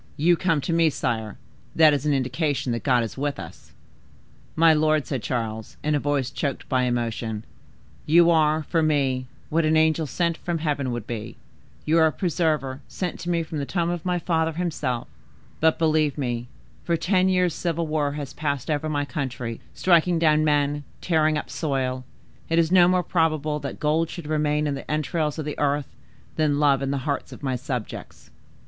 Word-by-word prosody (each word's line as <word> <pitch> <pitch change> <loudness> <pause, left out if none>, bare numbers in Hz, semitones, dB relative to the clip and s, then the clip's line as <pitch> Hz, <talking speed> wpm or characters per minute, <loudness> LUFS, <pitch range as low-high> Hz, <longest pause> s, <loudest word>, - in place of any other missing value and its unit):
You 175 +4 +4
come 165 -4 +1
to 165 - -2
me, 165 -1 +4
sire; 115 -6 -3 0.4
that 155 -2 +6
is 145 +1 -1
an 150 - +3
indication 135 0 -1
that 115 - -2
God 125 -4 +2
is 115 +3 -6
with 145 0 -2
us." - - -11 0.8
"My 165 0 +6
lord," 155 -1 +2
said 135 -5 -3
Charles, 110 -2 -4
in 150 - +1
a 145 - +2
voice 140 -2 -1
choked 140 0 -3
by 130 -2 +1
emotion, 115 -3 -2 0.6
"you 170 +2 +6
are, 155 -1 +3
for 165 +2 0
me, 135 -5 +1 0.2
what 165 +2 +2
an 155 0 +3
angel 160 0 +2
sent 170 +5 0
from 175 -1 -3
heaven 145 -5 -1
would 120 -3 -4
be,—you 120 +7 -5
are 160 - +6
a - - 0
preserver 155 -6 -1
sent 180 -2 -4
to 175 - -5
me 170 -1 +1
from 155 -1 -5
the 140 - -2
tomb 170 -2 0
of 175 -2 -4
my 180 -1 0
father 165 -2 0
himself; 155 -8 -2 0.5
but, 160 0 +3
believe 155 -3 +2
me, 120 -3 -2 0.4
for 170 - +1
ten 185 +3 +2
years' 180 -2 +2
civil 170 0 -2
war 150 -2 0
has 145 -2 -6
passed 145 -2 -2
over 150 +1 -1
my 145 -1 -1
country, 130 -6 -4 0.2
striking 175 -1 +3
down 155 -2 +3
men, 145 -1 +1 0.2
tearing 155 -3 +2
up - - -4
soil, 130 -4 -2 0.5
it 165 - +1
is 165 0 +3
no 180 -2 +7
more 180 0 +2
probable 155 -3 0
that 140 -1 -6
gold 155 +2 +1
should 170 - -7
remain 150 0 0
in 145 - 0
the 135 - -7
entrails 155 0 -1
of 155 - -4
the 150 - -5
earth, 145 0 -1 0.4
than 150 -2 +2
love 140 -2 +3
in 135 - -1
the 135 -2 -2
hearts 140 -3 -2
of - - -11
my 130 -2 0
subjects." 125 -3 -6
150 Hz, 190 wpm, -24 LUFS, 135-160 Hz, 0.8 s, no